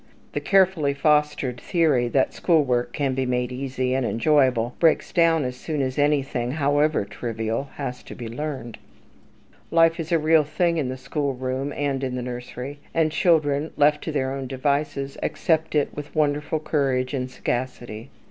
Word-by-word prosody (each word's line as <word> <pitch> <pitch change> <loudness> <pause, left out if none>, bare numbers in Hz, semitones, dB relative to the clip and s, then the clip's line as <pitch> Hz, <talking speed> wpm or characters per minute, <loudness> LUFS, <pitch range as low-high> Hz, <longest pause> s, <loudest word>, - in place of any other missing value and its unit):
The - - -1
carefully 180 -7 +3
fostered 150 -4 +1
theory 155 -9 +2
that 130 +2 +1
school 165 -4 +3
work 120 -2 0
can 140 -1 -1
be 130 0 -1
made 125 0 -1
easy 130 0 -2
and 130 0 +1
enjoyable 125 -1 +2
breaks 165 -2 +3
down 165 -3 +4
as 125 0 -3
soon 150 +3 -4
as 130 +1 -2
anything, 135 -4 +1
however 145 -3 +2
trivial, 115 +3 -3
has 125 -3 -5
to - - -9
be 120 - -6
learned. 125 -2 -5 0.9
Life 165 0 +4
is 165 0 -4
a 170 - +5
real 155 0 +4
thing 170 +3 0
in 140 -5 -1
the 130 - -4
school 135 +1 -2
room 130 +2 -3
and 140 -2 -2
in 130 -1 -2
the 125 - -3
nursery; 125 +3 -6 0.2
and 160 -1 +2
children 155 -3 +2
left 150 0 +3
to 160 - -2
their 135 -3 -1
own 135 -1 -4
devices 140 +1 -1
accept 160 -1 0
it 145 - +1
with 150 +1 -8
wonderful 150 +1 +1
courage 135 -4 0
and 130 -2 -2
sagacity. 120 -2 -4
140 Hz, 170 wpm, -24 LUFS, 125-150 Hz, 0.9 s, a